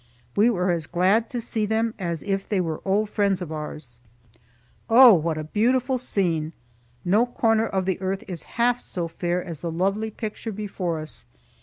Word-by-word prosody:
We 215 +4 +5
were 185 -5 +1
as 165 -3 -2
glad 190 +6 +2
to 245 - -3
see 225 -2 -2
them 220 +1 0
as 170 -4 -3
if 195 -1 -2
they 205 - +1
were 165 -3 -2
old 205 +2 +1
friends 200 -3 +1
of 175 -4 -6
ours. 150 -5 -7 0.9
Oh, 240 0 +9
what 165 -2 +1
a 155 - -3
beautiful 250 - +1
scene! 170 -9 -1 0.5
No 210 +7 +3
corner 225 -2 +2
of 190 -1 -1
the 190 0 -1
earth 190 +1 -2
is 175 -4 -6 0.2
half 240 +1 +3
so 175 -2 -4
fair 175 +2 -2
as 165 -5 -6
the 170 - -4
lovely 195 +6 0
picture 220 +1 -5
before 195 -5 -3
us. 150 - -9
195 Hz, 180 wpm, -24 LUFS, 170-220 Hz, 0.9 s, Oh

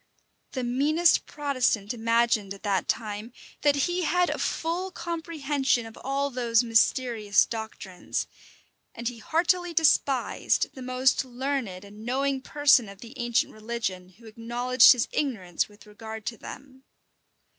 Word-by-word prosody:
[*] - - -47
The 255 - -3
meanest 295 +8 +2
Protestant 255 -7 0
imagined, 230 -3 +1
at 195 - -17
that 200 -3 0
time, 215 0 -3 0.3
that 290 -1 +4
he 355 +1 -1
had 355 +1 +2
a - - -4
full 345 +4 -2
comprehension 300 -8 -1
of 225 0 -11
all 275 +1 -1
those 240 -2 +2
mysterious 230 -2 +2
doctrines; 220 -5 -5 0.7
and 235 0 -4
he 240 -1 -4
heartily 345 +6 0
despised 280 -4 +2
the 260 - -10
most 255 +1 +1
learned 250 -7 -4
and 210 +2 -12
knowing 265 +2 -1
person 280 -6 +3
of 195 0 -13
the 235 +1 -10
ancient 240 -1 0
religion, 215 -5 -4
who 230 - -18
acknowledged 240 +3 +4
his 245 - -1
ignorance 215 - -1
with 205 +1 -18
regard 220 +1 -9
to 230 - -4
them. 265 -1 -11
245 Hz, 140 wpm, -26 LUFS, 220-280 Hz, 0.7 s, that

